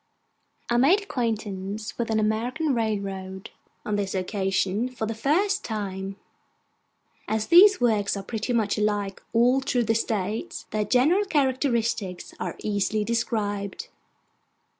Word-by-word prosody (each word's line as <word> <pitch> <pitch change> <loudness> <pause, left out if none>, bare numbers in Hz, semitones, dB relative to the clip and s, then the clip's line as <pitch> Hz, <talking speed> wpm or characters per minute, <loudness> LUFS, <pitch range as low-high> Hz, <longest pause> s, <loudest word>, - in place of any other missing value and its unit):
I 240 - +1
made 340 +12 +4
acquaintance 215 - -3
with 235 -1 -3
an 220 -1 +2
American 245 +8 0
railroad, 195 -4 -3 0.3
on 210 -1 -1
this 200 -1 -2
occasion, 190 +3 0
for 245 -3 -4
the 225 - -3
first 375 - +1
time. 195 -3 -4 1.1
As 220 0 0
these 390 +4 +8
works 215 -5 +1
are 195 - -5
pretty 220 +3 -3
much 220 -3 +1
alike 205 -2 -1
all 245 +3 +4
through 255 -3 +1
the 225 0 +1
States, 215 -2 -2
their 215 -1 0
general 300 - +3
characteristics 245 - 0
are - - -3
easily 210 +1 0
described. 205 -3 -2
220 Hz, 125 wpm, -25 LUFS, 200-245 Hz, 1.1 s, these